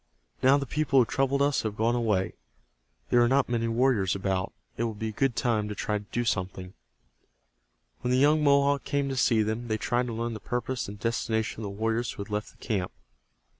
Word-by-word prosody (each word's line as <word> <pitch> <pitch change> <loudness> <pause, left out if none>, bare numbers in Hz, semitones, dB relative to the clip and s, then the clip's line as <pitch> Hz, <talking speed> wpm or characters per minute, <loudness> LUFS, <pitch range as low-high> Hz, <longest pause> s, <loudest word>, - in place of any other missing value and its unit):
Now 135 +2 +6
the 140 - -2
people 140 0 0
who 125 - +6
troubled 135 +3 +1
us 145 -1 +2
have 110 -2 -3
gone 115 +2 +2
away. 110 -6 0 0.8
There 120 - +5
are 120 - +5
not 135 +3 +3
many 115 -1 0
warriors 115 -5 +2
about. 95 -1 -1 0.2
It 115 - -1
will 110 -2 -3
be 110 +1 -3
a - - -4
good 125 +3 0
time 110 -2 0
to 105 - -4
try 105 0 -1
to 105 - -13
do 120 0 -1
something." 95 -2 -2 1.3
When 125 - -3
the 125 - +3
young 150 +3 +4
Mohawk 140 0 +3
came 140 -1 -1
to 135 - -2
see 115 -3 +3
them 110 +3 -3
they 110 -1 0
tried 120 +3 0
to 115 - -4
learn 115 +1 -2
the 110 - -6
purpose 125 +2 -3
and 100 +1 -8
destination 110 -1 -1
of - - -4
the - - -3
warriors 115 +2 0
who 100 - -5
had 105 - -14
left 105 +1 -2
the - - -22
camp. 100 -6 -2
115 Hz, 220 wpm, -28 LUFS, 105-130 Hz, 1.3 s, Now